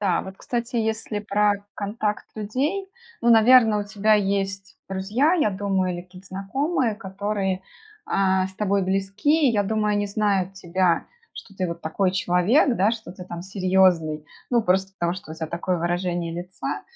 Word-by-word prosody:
Да, 190 -4 +1
вот, 190 0 -9
кстати, 240 +2 -3
если 220 -1 -1
про 205 0 +2 0.2
контакт 210 0 -2
людей, 270 - -2 0.3
ну, 235 - +3
наверно, 225 -1 +6
у 205 - -2
тебя 210 +1 +2
есть 195 -1 -1
друзья, 205 - +1
я 305 -11 +2
думаю, 190 -2 -1
или 175 - -6
какие-то 180 +1 -15
знакомые, 240 - -1
которые, 195 -1 -3 0.4
а, 190 -1 +2
с 190 - -12
тобой 200 0 +1
близки. 200 - +2
И, - - +2
я 205 -2 +2
думаю, 210 +1 0
они 205 0 0
знают 200 -2 0
тебя, 180 -2 0 0.3
что 200 - -11
ты 185 -1 -1
вот 170 0 -5
такой 180 +4 0
человек, 190 - +3
да, 200 +4 +3
что 220 -6 -6
ты 180 0 -10
там 175 -1 -7
серьезный. 185 -5 +2 0.2
Ну, 240 -2 +3
просто 190 0 +1
потому 175 -2 -1
что 180 -4 -9
у - - -7
тебя 160 0 -4
такое 170 +2 -2
выражение 175 0 -1
лица. 175 +2 -5
195 Hz, 170 wpm, -24 LUFS, 185-215 Hz, 0.4 s, наверно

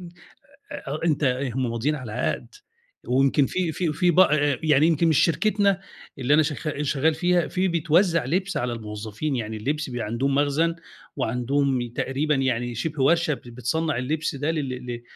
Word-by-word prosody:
إمم. 175 - -9 0.6
أ 145 +3 -5
أنت 150 -3 +1
إيه، 130 -1 0
هم 130 -3 -1
ماضيين 120 +6 0
على 125 -7 -7
عَقْد. 125 - -3 0.5
ويمكن 135 +2 +3
في 180 -3 -1
في 165 0 -1
في 175 +3 +2
بأ 150 -6 +4
يعني 150 -1 +4
يمكن 165 0 +2
من 160 - +4
شركتنا 200 +5 +2 0.4
اللي 135 +2 +2
أنا 155 - +6
شغ 150 0 -3
شغّال 150 +2 +1
فيها، 175 +1 +1
في 190 0 0
بيتوزّع 170 -1 +2
لِبْس 185 +8 -1
على 120 0 -1
الموظفين. 110 +5 -4
يعني 110 -2 -4
اللبس 140 +6 -2
بيبقى 120 -3 -3
عندهم 130 +6 -1
مخزن 145 +4 +2 0.4
وعندهم 125 +1 0
تقريبًا 145 +5 0
يعني 120 -3 -1
شِبه 150 +4 -2
ورشة 165 +2 +3
ب - - -11
بتصنّع 125 +6 -2
اللِبْس 150 +5 -2
ده 145 +3 -1
لل 155 -4 -2 0.2
ل 120 -1 -5
145 Hz, 170 wpm, -24 LUFS, 125-160 Hz, 0.6 s, أنا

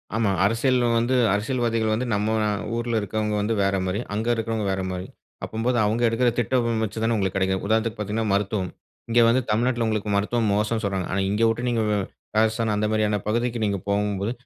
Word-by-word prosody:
ஆமா. 110 -3 +2
அரசியல் 120 +4 +2 0.2
வந்து 120 +3 +1 0.2
அரசியல்வாதிகள் 115 0 0
வந்து 120 +4 -1
நம்ம 105 +2 0 0.4
ஊரில 120 -1 0
இருக்கிறவங்க 105 +1 -2
வந்து 105 +2 0
வேற 100 0 +1
மாரி, 95 +3 -1
அங்க 110 +2 -2
இருக்கிறவங்க 115 -1 -2
வேற 95 0 -1
மாரி. 90 +1 -5 0.4
அப்பம்போது 120 +3 -1
அவங்க 110 +3 0
எடுக்கிற 120 +2 +2
திட்டம் 115 -1 +1
வச்சு 110 +1 -4
தானே 115 +1 +2
உங்களுக்கு 95 -2 -1
கிடைக்கும். 95 0 0
உதாரணத்துக்கு 110 +1 0
பார்த்தீங்கனா 105 +2 -2
மருத்துவம். 100 -2 -1 0.4
இங்க 120 - +3
வந்து 120 +3 +3
தமிழ்நாட்டில 120 +1 +1
உங்களுக்கு 110 -1 -1
மருத்துவம் 105 +2 +1
மோசம் 105 +2 0
சொல்றாங்க. 95 -2 -1
ஆனா, 100 - 0
இங்க 105 +3 +1
விட்டு 115 +2 -1
நீங்க 115 -2 +1 0.5
ராஜஸ்தான் 110 0 +2
அந்த 105 +1 0
மாதிரியான 105 -1 +1
பகுதிக்கு 120 +2 0
நீங்க 100 -2 0
போகும்போது, 100 +1 0
110 Hz, 180 wpm, -24 LUFS, 105-115 Hz, 0.5 s, இங்க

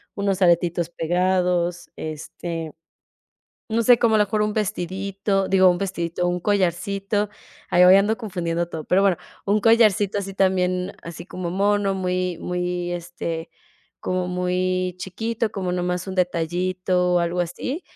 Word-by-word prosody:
unos 200 -1 -1
aretitos 170 -1 +2
pegados, 175 0 0
este, 160 +1 -6 1.0
no 225 +1 +1
sé, 240 +1 +6
como 230 -2 +3
a - - +3
lo 210 - +5
mejor 210 +1 0
un 210 0 0
vestidito, 195 0 -1
digo, 190 -1 +5
un 175 - 0
vestidito, 175 -2 -2
un 175 0 -1
collarcito. 200 +2 0 0.4
Ay, 180 +1 +6
hoy 185 +1 +8
ando 210 +3 +2
confundiendo 170 -6 -2
todo, 160 -2 -6
pero 185 +5 +3
bueno, 195 -3 +3 0.3
un 205 +2 +2
collarcito 210 -3 +4
así 195 -1 -5
también, 185 0 +1
así 170 0 -8
como 180 -2 -5
mono, 200 +1 +1
muy 180 -1 -1
muy, 180 0 -2
este, 170 -1 -5 0.5
como 185 0 -1
muy 180 0 -1
chiquito, 225 +4 -3
como 185 -3 -3
nomás 180 0 -2
un 190 - -5
detallito 180 +1 0
o 175 - +5
algo 170 +1 -1
así. 255 - -3
185 Hz, 145 wpm, -23 LUFS, 175-195 Hz, 1.0 s, hoy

